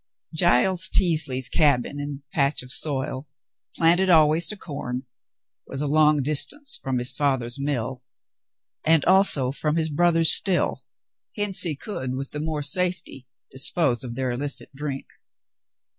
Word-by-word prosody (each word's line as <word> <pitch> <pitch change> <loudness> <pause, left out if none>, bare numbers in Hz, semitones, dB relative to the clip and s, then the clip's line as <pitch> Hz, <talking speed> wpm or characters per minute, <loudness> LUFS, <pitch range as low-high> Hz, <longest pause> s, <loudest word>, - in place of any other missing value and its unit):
Giles 180 +5 +3
Teasley's 155 -9 +1
cabin 145 0 0
and 145 -1 -7
patch 140 -2 0
of 125 - -11
soil, 135 -1 -2 0.5
planted 175 +3 +3
always 160 0 +3
to 210 - -6
corn, 130 -7 -7 0.6
was 135 - -7
a 150 - -2
long 150 -1 +2
distance 285 - 0
from 130 -1 -3
his 125 +1 -1
father's 130 -2 -2
mill, 130 -3 -4 0.8
and 160 -2 +2
also 180 -9 +5
from 150 +2 -3
his 160 -1 -1
brother's 165 +1 +4
still, 185 -2 +2 0.5
hence 205 -2 +2
he 165 -5 +1
could 130 - -6
with 135 +1 -6
the 150 - -6
more 155 -1 -4
safety 175 -3 -1 0.2
dispose 135 -1 +1
of 120 -2 -8
their 130 -1 -3
illicit 140 +4 -5
drink. 135 -1 -6
145 Hz, 140 wpm, -22 LUFS, 130-165 Hz, 0.8 s, also